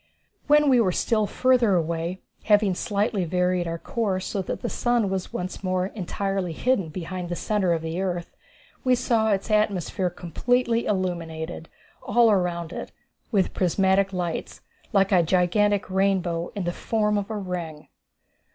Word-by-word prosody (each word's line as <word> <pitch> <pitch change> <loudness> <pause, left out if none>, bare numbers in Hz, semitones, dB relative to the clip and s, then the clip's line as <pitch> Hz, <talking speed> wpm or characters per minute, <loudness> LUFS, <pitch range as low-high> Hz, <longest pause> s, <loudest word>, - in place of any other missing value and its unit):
When 295 0 +5
we 255 -3 +5
were 190 -5 +2
still 215 +3 +1
further 250 -5 +3
away, 170 +2 -2 0.2
having 205 -2 +4
slightly 200 +1 -1
varied 180 +1 0
our 165 0 -3
course 190 -1 -2
so 195 - -2
that 185 - -5
the 240 - -2
sun 235 -5 +1
was 190 -1 -3
once 185 +2 -5
more 185 -1 0
entirely 195 -2 -3
hidden 200 -3 0
behind 180 +2 -5
the 175 - -2
centre 200 -1 0
of 165 -1 0
the 165 +3 -3
earth, 175 -3 -3 0.5
we 255 -1 +4
saw 230 -3 +1
its 200 +1 0
atmosphere 195 -3 +1
completely 235 +8 0
illuminated, 170 -4 -3 0.3
all 235 +1 +4
around 175 -3 0
it, - - -6 0.4
with 195 -5 +1
prismatic 190 +2 +2
lights, 175 -3 -4 0.3
like 195 -1 +3
a 185 -3 +5
gigantic 190 +4 +2
rainbow 185 -3 0
in 200 - -2
the 175 0 -2
form 210 0 0
of 205 0 -2
a 220 - -3
ring. 175 -6 -5
190 Hz, 155 wpm, -25 LUFS, 175-210 Hz, 0.5 s, When